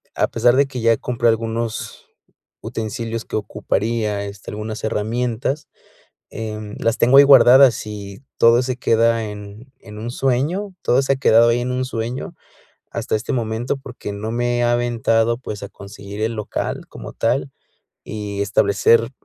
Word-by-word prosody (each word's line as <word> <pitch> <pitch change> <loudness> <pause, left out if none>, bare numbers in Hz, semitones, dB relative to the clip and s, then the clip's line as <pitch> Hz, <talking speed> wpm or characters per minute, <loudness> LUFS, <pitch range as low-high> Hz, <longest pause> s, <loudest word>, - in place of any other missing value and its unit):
a - - +2
pesar 120 +2 +3
de 140 - +4
que 130 -3 -6
ya 115 -1 +3
compré 120 -1 -1
algunos 115 0 -3 0.5
utensilios 115 +1 -4
que - - -6
ocuparía, 105 0 -1
este, 100 0 -9
algunas 110 +1 -6
herramientas, 120 +6 -2 0.6
em, 105 -1 -6
las 115 0 0
tengo 125 +3 +5
ahí 140 - +10
guardadas 130 -2 +7
y 100 -1 -8 0.2
todo 115 +1 +5
se 130 0 -2
queda 115 -1 +2
en 105 +5 -11
en 105 -1 -11
un 115 +2 -5
sueño, 145 +11 -1
todo 130 +3 +3
se 135 0 +1
ha - - -5
quedado 115 -3 +5
ahí 120 +1 +1
en 125 +1 -2
un 130 0 -1
sueño 120 0 -4 0.6
hasta - - -2
este 110 - -3
momento, 120 +3 -2
porque 125 -6 -8
no 110 +2 -5
me 120 +1 0
he 120 - +2
aventado, 120 -1 +1
pues, 105 -5 -7
a 100 - -7
conseguir 100 +1 -9
el 115 +1 0
local 105 -2 -4
como - - -9
tal, - - -1 0.5
y 105 -2 -4
establecer, 100 +4 +3
115 Hz, 160 wpm, -20 LUFS, 110-125 Hz, 0.6 s, ahí